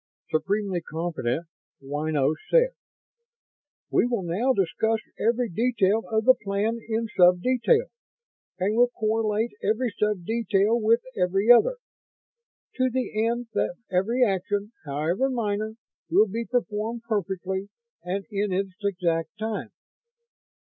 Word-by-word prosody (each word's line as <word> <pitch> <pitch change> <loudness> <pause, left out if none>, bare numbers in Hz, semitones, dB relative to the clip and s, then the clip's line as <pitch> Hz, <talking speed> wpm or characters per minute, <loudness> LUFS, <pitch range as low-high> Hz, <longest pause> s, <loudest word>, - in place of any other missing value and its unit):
Supremely 190 +3 0
confident, 160 -3 -3 0.4
Ynos 145 +1 0
said: - - +4 1.2
"We - - +3
will 235 -6 -1
now 195 +10 +1
discuss 220 +1 +1 0.2
every 235 +2 +1
detail 220 0 +1
of 220 -1 0
the 255 - +8
plan 210 +2 -2
in 225 0 -1
sub 180 0 +6
detail, 260 - +3 0.7
and 195 +3 0
will 245 +1 +5
correlate 220 -1 0
every 225 +2 0
sub 210 -4 0
detail 225 0 +1
with 230 +2 +4
every 195 +5 +3
other, - - +6 1.0
to 255 0 +2
the 235 -3 -1
end 235 0 -2
that 105 +11 0 0.2
every 225 +8 +2
action, 205 +1 -1
however 160 - 0
minor, 215 -3 -2 0.3
will 215 - +5
be 230 +4 -3
performed 230 -1 -2
perfectly 190 -2 -2 0.3
and 190 +3 -3
in 205 0 -1
its 190 0 -1
exact 170 -5 0
time." 220 -1 -3
210 Hz, 120 wpm, -26 LUFS, 185-230 Hz, 1.2 s, the